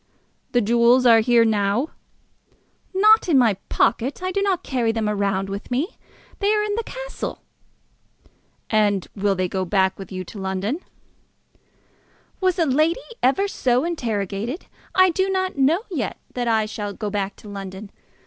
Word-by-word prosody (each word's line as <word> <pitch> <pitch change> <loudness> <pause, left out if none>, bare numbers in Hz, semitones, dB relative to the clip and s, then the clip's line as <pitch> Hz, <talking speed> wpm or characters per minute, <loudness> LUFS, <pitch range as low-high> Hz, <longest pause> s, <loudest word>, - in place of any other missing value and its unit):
"The 245 - +4
jewels 235 +3 +4
are 230 -2 +7
here 235 0 +4
now?" 215 +6 +1 1.0
"Not 425 +1 +5
in 300 - +5
my 235 -5 +5 0.2
pocket. 260 +9 +1
I 370 - -1
do 395 - 0
not 385 -3 0
carry 240 -4 0
them 225 -1 -1
about 200 -2 0
with 200 +1 -6
me. 275 - -2 0.4
They 405 0 +2
are 420 - +1
in 420 -1 -1
the 460 +2 -1
castle." - - -6 1.3
"And 205 -3 +2
will 200 -1 +1
they 185 0 0
go 190 +1 -2
back 190 +1 +1
with 195 - -9
you 185 -1 -4
to 200 +3 -10
London?" 190 - -2 1.6
"Was 370 -1 +1
ever 325 -6 +2
lady 310 - +2 0.5
so 255 -9 +1
interrogated? 230 - -3 0.3
I 370 -1 +6
do 380 +3 0
not 375 -5 -1
know 315 +9 +3
yet 255 - -2 0.2
that 245 -1 -2
I 220 -2 +2
shall 210 -1 -5
go 210 0 -4
back 200 -1 -2
to - - -14
London. 195 0 -8
235 Hz, 160 wpm, -22 LUFS, 200-335 Hz, 1.6 s, are